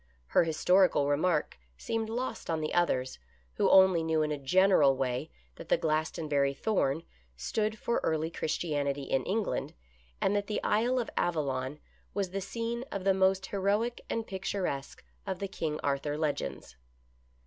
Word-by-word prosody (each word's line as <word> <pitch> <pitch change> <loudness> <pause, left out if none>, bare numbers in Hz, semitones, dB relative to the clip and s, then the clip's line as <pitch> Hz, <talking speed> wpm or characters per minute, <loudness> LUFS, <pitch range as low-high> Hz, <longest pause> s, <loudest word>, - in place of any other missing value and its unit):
Her - - +4
his 160 -1 -2
torical 180 -6 +5
remark 150 - +1 0.2
seemed 225 -1 -2
lost 245 +3 -4
on 165 -1 0
the 155 0 -3
others, 130 - +1 0.4
who - - +3
only 190 -3 +6
knew 160 -1 +1
in 150 - -1
a 150 - -1
general 150 -2 +4
way 125 -2 -2 0.3
that - - -10
the - - +4
Glastonbury 155 -3 0
Thorn 160 -5 0 0.3
stood 215 - -1
for 235 - 0
early 160 0 0
Christianity 145 -4 -1
in 135 -1 0
England, 210 +2 -2 0.4
and 200 - +1
that 205 0 0
the 210 - -1
Isle 235 +5 +2
of 240 - -2
Avallon 140 -4 -1 0.4
was 195 -3 -1
the 195 +1 -3
scene 230 +4 -3
of 195 - -3
the 195 0 +4
most 190 0 +2
heroic 205 +5 0
and 225 -1 -2
pictur 190 -1 -3
esque 140 -3 -4 0.2
of 190 -1 -2
the 200 - -3
King 155 -5 -3
Arthur 145 +1 -1
legends. 145 - -3
170 Hz, 160 wpm, -30 LUFS, 145-200 Hz, 0.4 s, only